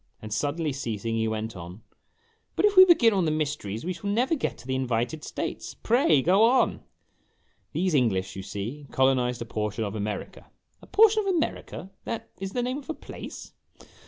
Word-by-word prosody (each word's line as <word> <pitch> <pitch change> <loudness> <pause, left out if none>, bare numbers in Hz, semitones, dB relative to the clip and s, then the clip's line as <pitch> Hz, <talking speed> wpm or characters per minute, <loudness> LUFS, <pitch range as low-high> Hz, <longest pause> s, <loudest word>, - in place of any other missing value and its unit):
Then 110 - -9
suddenly 150 +5 -1
ceasing 115 -4 -3
he 110 0 0
went 110 0 -3
on, 90 +3 -9 0.3
" 455 0 -41
But - - +3
if 415 -1 +3
we 375 0 +11
begin 290 - +5
on 190 -3 +2
the - - +2
mysteries 145 -8 -2
we 185 - -1
shall 200 +4 -5
never 245 +9 +1
get 310 - -2
to 120 - -14
the 130 - -2
invited 130 +3 -1
states. - - -5
Pray 220 - +3
go 190 +5 +4
on." 245 +3 +3 0.9
"These 185 -1 0
English, 105 -9 +1
you 95 - -5
see, 115 +10 -6
colonized 125 -2 +2
a - - -11
portion 105 0 -3
of 100 -2 -3
America 105 -1 -5
" - - -52
" - - -41
A - - -15
portion 435 0 +5
of 390 -3 0
America 310 - -3
that 230 - -5
is 195 0 -5
the 245 - 0
name 255 +3 -2
of 290 - -15
a 320 - -2
place - - -9
145 Hz, 200 wpm, -26 LUFS, -, 0.9 s, we